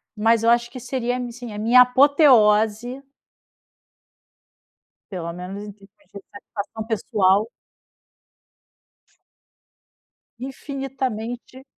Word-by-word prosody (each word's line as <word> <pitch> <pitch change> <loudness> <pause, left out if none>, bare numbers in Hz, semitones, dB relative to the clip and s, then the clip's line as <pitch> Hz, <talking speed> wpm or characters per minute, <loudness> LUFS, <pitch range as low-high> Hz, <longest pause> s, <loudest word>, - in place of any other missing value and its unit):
mas 225 +1 +2
eu 230 - +3
acho 235 0 +2
que 255 - -8
seria, 250 0 -3
assim, 245 -2 -7
a 205 - -6
minha 235 +4 +6
apoteose 250 -3 +4 2.1
pelo 170 -3 -5
menos 180 +3 -8
em - - -9
níveis 200 -1 -14 0.3
de 200 - -8
satisfação 210 +1 -8
pessoal. 205 -2 +1 2.9
Infinitamente 260 -2 -6
230 Hz, 85 wpm, -22 LUFS, 210-250 Hz, 2.9 s, minha